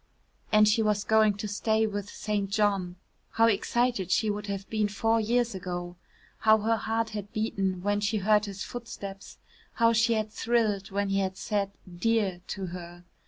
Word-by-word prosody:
And 215 Hz, 0 st, +6 dB
she 220 Hz, +2 st, +3 dB
was 210 Hz, -1 st, +1 dB
going 220 Hz, -1 st, +4 dB
to 210 Hz, +1 st, -4 dB
stay 220 Hz, +2 st, +1 dB
with 205 Hz, -1 st, -4 dB
St. 205 Hz, -2 st, -2 dB
John. 200 Hz, -4 st, +1 dB, 0.4 s
How 225 Hz, -, +4 dB
excited 230 Hz, -2 st, +1 dB
she 215 Hz, +3 st, +2 dB
would 210 Hz, 0 st, -5 dB
have 200 Hz, -1 st, -4 dB
been 215 Hz, -2 st, 0 dB
four 225 Hz, +2 st, +1 dB
years 235 Hz, +1 st, +1 dB
ago. 175 Hz, -2 st, -5 dB, 0.4 s
How 220 Hz, 0 st, +5 dB
her 225 Hz, +2 st, +2 dB
heart 225 Hz, 0 st, -1 dB
had 205 Hz, -1 st, -6 dB
beaten 195 Hz, -4 st, -1 dB
when 205 Hz, +1 st, +1 dB
she 205 Hz, +1 st, 0 dB
heard 210 Hz, +1 st, +3 dB
his 195 Hz, -2 st, -6 dB
footsteps, 200 Hz, -5 st, -8 dB, 0.4 s
how 230 Hz, -1 st, +3 dB
she 230 Hz, +1 st, +3 dB
had 215 Hz, -1 st, -1 dB
thrilled 215 Hz, -4 st, 0 dB
when 200 Hz, 0 st, -1 dB
he 195 Hz, 0 st, +1 dB
had 190 Hz, -1 st, -2 dB
said 200 Hz, -2 st, -1 dB, 0.3 s
"dear" 210 Hz, -5 st, +1 dB
to 195 Hz, -, -4 dB
her. 175 Hz, -1 st, -9 dB
210 Hz, 175 wpm, -28 LUFS, 195-220 Hz, 0.4 s, And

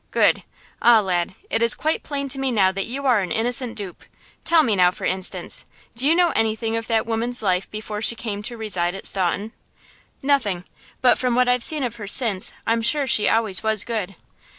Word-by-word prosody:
Good! -, -, +2 dB, 0.4 s
ah, 235 Hz, -2 st, +6 dB
lad, 185 Hz, -2 st, -1 dB, 0.2 s
it 225 Hz, -, 0 dB
is 230 Hz, -1 st, +3 dB
quite 315 Hz, +1 st, -1 dB
plain 280 Hz, -2 st, -4 dB
to 270 Hz, -, -3 dB
me 270 Hz, 0 st, 0 dB
now 195 Hz, -5 st, +3 dB
that 195 Hz, 0 st, -4 dB
you 275 Hz, +4 st, -5 dB
are 250 Hz, -5 st, +4 dB
an 180 Hz, -3 st, -5 dB
innocent 240 Hz, +2 st, 0 dB
dupe. 195 Hz, -4 st, -7 dB, 0.4 s
Tell 330 Hz, -2 st, +4 dB
me 225 Hz, -7 st, +1 dB
now, 180 Hz, -2 st, +5 dB
for 180 Hz, -, -7 dB
instance, 185 Hz, 0 st, -1 dB, 0.3 s
do 255 Hz, +4 st, +1 dB
you 320 Hz, -, +4 dB
know 350 Hz, -1 st, +3 dB
anything 225 Hz, 0 st, -1 dB
of 225 Hz, 0 st, -4 dB
that 225 Hz, -2 st, +1 dB
woman's 230 Hz, +1 st, -2 dB
life 185 Hz, -1 st, 0 dB
before 210 Hz, 0 st, -6 dB
she 235 Hz, -, +5 dB
came 210 Hz, -3 st, -5 dB
to 235 Hz, +2 st, -6 dB
reside 185 Hz, -5 st, 0 dB
at 195 Hz, -, -6 dB
Staunton?" 195 Hz, +3 st, 0 dB, 0.7 s
"Nothing; 235 Hz, -11 st, 0 dB, 0.4 s
but 250 Hz, -, +4 dB
from 250 Hz, -2 st, 0 dB
what 250 Hz, 0 st, +3 dB
I've 250 Hz, -1 st, +2 dB
seen 305 Hz, -3 st, +2 dB
of 235 Hz, -2 st, -4 dB
her 205 Hz, -3 st, -7 dB
since 205 Hz, -3 st, +3 dB
I'm 230 Hz, 0 st, +1 dB
sure 275 Hz, +5 st, +1 dB
she 215 Hz, -5 st, +2 dB
always 220 Hz, -4 st, 0 dB
was 220 Hz, -2 st, 0 dB
good." 210 Hz, -5 st, -4 dB
225 Hz, 210 wpm, -22 LUFS, 200-250 Hz, 0.7 s, ah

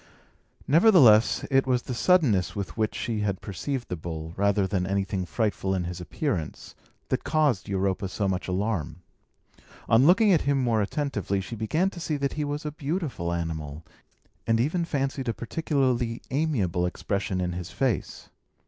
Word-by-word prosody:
Nevertheless, 145 Hz, -, +6 dB
it 135 Hz, 0 st, +3 dB
was 125 Hz, -1 st, +1 dB
the 125 Hz, -, -4 dB
suddenness 125 Hz, -, +2 dB
with 100 Hz, -2 st, -5 dB
which 110 Hz, -1 st, -1 dB
she 115 Hz, -3 st, -2 dB
had 100 Hz, -3 st, -1 dB
perceived 120 Hz, +6 st, -4 dB
the 90 Hz, -, -3 dB
bull, 80 Hz, -1 st, -6 dB
rather 100 Hz, 0 st, +2 dB
than 95 Hz, -2 st, -1 dB
anything 95 Hz, -1 st, -1 dB
frightful 100 Hz, -3 st, -1 dB
in 90 Hz, -, -1 dB
his 90 Hz, 0 st, -5 dB
appearance, 90 Hz, -, -4 dB, 0.4 s
that -, -, -1 dB
caused 145 Hz, -12 st, +1 dB
Europa 95 Hz, 0 st, 0 dB
so 100 Hz, +1 st, -1 dB
much 95 Hz, -1 st, -2 dB
alarm. 95 Hz, -3 st, -2 dB, 0.8 s
On 120 Hz, +6 st, +5 dB
looking 200 Hz, +3 st, +5 dB
at 165 Hz, -, +3 dB
him 140 Hz, 0 st, +1 dB
more 115 Hz, -4 st, +2 dB
attentively, 105 Hz, -4 st, -1 dB
she 95 Hz, +4 st, -6 dB
began 155 Hz, -, 0 dB
to 175 Hz, -, -9 dB
see 155 Hz, -3 st, -2 dB
that 140 Hz, -1 st, -1 dB
he 150 Hz, -, -2 dB
was 145 Hz, +1 st, -4 dB
a 150 Hz, -, -2 dB
beautiful 145 Hz, -, -3 dB
animal, 80 Hz, -3 st, -4 dB, 0.6 s
and 115 Hz, 0 st, +3 dB
even 165 Hz, +8 st, +1 dB
fancied 135 Hz, -4 st, -2 dB
a 115 Hz, -, -1 dB
particularly 125 Hz, -4 st, -1 dB
amiable 110 Hz, -, 0 dB
expression 95 Hz, +1 st, -2 dB
in 90 Hz, -1 st, -1 dB
his 90 Hz, -1 st, -5 dB
face. 105 Hz, +4 st, -2 dB
110 Hz, 165 wpm, -26 LUFS, 95-140 Hz, 0.8 s, Nevertheless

